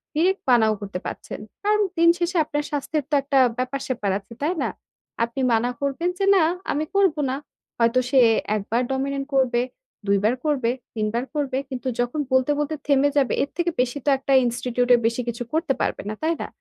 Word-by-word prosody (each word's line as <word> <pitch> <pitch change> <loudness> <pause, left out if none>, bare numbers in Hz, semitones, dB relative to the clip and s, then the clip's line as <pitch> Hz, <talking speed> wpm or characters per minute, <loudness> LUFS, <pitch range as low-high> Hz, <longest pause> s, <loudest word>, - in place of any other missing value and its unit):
direct 370 +5 +2
মানাও 220 -3 +5
করতে 200 -2 -5
পারছেন। - - -6 0.2
কারণ 425 +1 +3 0.2
দিন 335 0 +6
শেষে 355 +1 -1
আপনার 295 0 -2
স্বাস্থ্যের 295 +1 -1
তো - - -7
একটা 275 0 +1 0.2
ব্যাপার-স্যাপার 255 -5 -2
আছে, 205 - -14
তাই 335 +5 +1
না? - - 0 0.5
আপনি 235 +3 -3
মানা 230 +2 +2
করবেন 280 +5 0
যে, 395 - +2
"না, 365 - +5 0.3
আমি 300 +2 -1
করবো 385 -6 +3
না।" 260 - -1 0.4
হয়তো 230 +2 +3
সে 265 - +4 0.4
১ 210 - -1
বার 235 +2 +2
dominant 275 +1 -2
করবে, 255 -3 +2 0.5
২ 200 0 +4
বার 220 +4 +3
করবে, 275 -6 +1 0.3
৩ 215 -1 0
বার 235 +1 0
করবে, 280 -3 -1
কিন্তু 260 0 -5
যখন 245 +5 -1
বলতে, 260 +2 +3
বলতে 295 +1 -1
থেমে 285 0 +4
যাবে, 270 -3 +3
এর 280 - -4
থেকে 345 0 +1
বেশি 250 +2 -2
তো - - +3
একটা 270 +1 -1
ইনস্টিটিউটের 245 0 +2
বেশি 230 +2 -1
কিছু 235 +1 -3
করতে 320 -3 +1
পারবে - - -1
না, - - -2
তাই 325 +1 +2
না? - - -3
270 Hz, 195 wpm, -23 LUFS, 240-300 Hz, 0.5 s, দিন